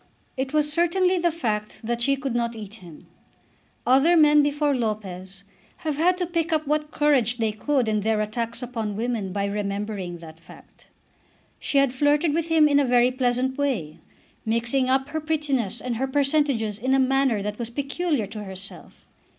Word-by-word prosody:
It 265 0 -3
was 300 -1 +2
certainly 360 +2 +2
the 345 0 +2
fact 215 -10 -3
that 235 +1 -2
she 275 +3 +3
could 270 -2 -4
not 235 -1 -1
eat 210 -2 -8
him. 170 -4 -13 0.8
Other 275 +8 +4
men 300 -1 +6
before 290 0 +1
Lopez 195 -5 -4 0.4
have 300 -3 -1
had 355 +3 +3
to 360 - -1
pick 335 -1 -2
up 310 -1 +1
what 300 +1 -1
courage 270 -6 +2
they 225 -2 0
could 255 +3 0
in 215 -1 +1
their 215 +1 0
attacks 230 +3 -3
upon 225 -4 -4
women 225 -3 -2
by 200 +1 -1
remembering 200 -2 -3
that 160 -1 -13
fact. - - -17 0.7
She 285 - -1
had 275 -2 +3
flirted 290 +3 +2
with 335 +1 -1
him 320 -2 +5
in 285 -1 +3
a - - +3
very 245 -1 +3
pleasant 255 +1 -1
way, 170 - -2 0.4
mixing 235 +4 +1
up 265 +1 +1
her 315 +1 -3
prettiness 285 -9 -1
and 235 +1 -3
her 265 +3 -1
percentages 270 -6 0
in 260 +4 +1
a - - +3
manner 265 -5 +2
that 210 +2 -4
was 235 -1 -4
peculiar 280 0 -1
to 210 +1 -8
herself. 190 0 -11
255 Hz, 180 wpm, -24 LUFS, 215-295 Hz, 0.8 s, men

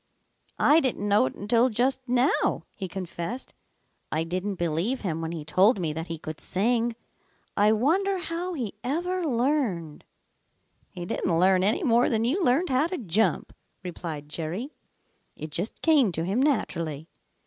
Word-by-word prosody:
"I 305 +2 +5
didn't 250 -8 -1
know 200 -9 +4
it - - -7
until 230 +5 +2
just 255 +4 +1
how," 250 +3 +2
he 190 - -5
confessed. 185 +5 -5 0.6
"I 155 +1 0
didn't 185 +4 -3
believe 175 +9 -1
him 165 -5 -2
when 165 0 -3
he 160 -3 -6
told 190 +9 +4
me 160 -4 -1
that 160 +2 -5
he 165 - -4
could 155 0 -7
sing. 230 +4 +1 0.6
I 210 +1 +4
wonder 370 - +2
how 350 0 -4
he 240 -9 -3
ever 350 +8 -1
learned." 240 - -1 0.8
"He 175 -2 -7
didn't 175 -1 -1
learn 185 0 +4
any 215 - +2
more 240 -3 +4
than 225 -1 +1
you 330 +11 +1
learned 300 +6 +2
how 265 +4 +2
to 365 +1 -4
jump," 215 0 0 0.3
replied 165 -4 -6
Jerry. 170 - -4 0.6
"It 155 - -7
just 180 +8 -3
came 290 - +4
to 160 - -2
him 200 +8 0
naturally. 165 - -1
210 Hz, 160 wpm, -26 LUFS, 170-265 Hz, 0.8 s, I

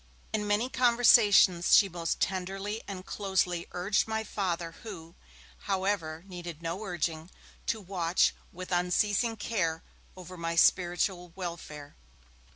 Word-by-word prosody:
In 210 -1 -1
many 205 +4 +1
conversations, 235 -8 +5
she 200 - +5
most 170 -2 -3
tenderly 195 +3 -2
and 190 -2 -7
closely 185 -4 -1
urged 190 +5 0
my 220 0 -2
Father, 175 -6 -3
who, 170 -7 -9 0.6
however, 190 -5 -1
needed 175 -3 -8
no 170 +6 -3
urging, 170 -3 -3 0.4
to 230 -1 0
watch 180 -3 +1 0.2
with 185 +1 -9
unceasing 205 +6 +1
care 170 -7 -2 0.3
over 185 0 -10
my 170 0 -3
spiritual 175 0 +2
welfare. 170 -5 -7
185 Hz, 120 wpm, -29 LUFS, 170-205 Hz, 0.6 s, conversations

